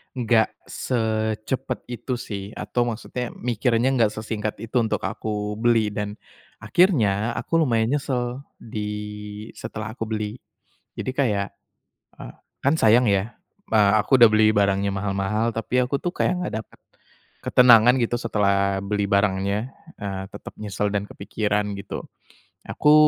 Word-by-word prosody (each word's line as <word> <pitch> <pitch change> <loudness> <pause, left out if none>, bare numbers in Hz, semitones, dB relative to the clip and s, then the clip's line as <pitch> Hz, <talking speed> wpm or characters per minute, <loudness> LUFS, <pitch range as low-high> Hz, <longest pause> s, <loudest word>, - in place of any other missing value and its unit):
nggak 115 -3 +2 0.2
secepat 110 +2 -2
itu 125 +1 -3
sih 100 -3 -6
atau 120 - -1
maksudnya 120 +1 -4
mikirnya 120 0 +1
nggak 115 -4 +3
sesingkat 110 -1 -3
itu 115 - -9
untuk 110 - -1
aku 105 -1 -3
beli 115 0 +3
dan, 105 +1 -4 0.4
akhirnya 115 - +2
aku 165 - 0
lumayan 115 -4 +2
nyesel 125 -2 -2 0.2
di 110 -2 -7 0.8
setelah 110 -1 -6
aku 115 - -3
beli, 110 0 -3 0.6
jadi 130 - -2
kayak, 105 -6 +1 0.7
eee, - - -9 0.3
kan 140 +3 +4
sayang 115 +1 +5
ya, 100 +4 0 0.4
a 105 0 +5
aku 130 - +3
udah 120 - +10
beli 110 0 +5
barangnya 100 0 +2
mahal-mahal 100 +3 -1
tapi 115 +3 -1
aku 140 +3 -1
tuh 175 - 0
kayak 180 0 0
nggak 180 - -3
dapat, - - -23 0.7
ketenangan 125 -1 +7
gitu 120 +1 0
setelah 100 -3 +1
beli 105 0 -1
barangnya, 100 +3 +1 0.3
eee, 95 -2 -4
tetap - - -9
nyesel 105 -1 -2
dan 100 0 -1
kepikiran 105 0 -1
gitu, 100 0 -6 0.7
aku, 150 - +3
110 Hz, 135 wpm, -24 LUFS, 105-120 Hz, 0.8 s, udah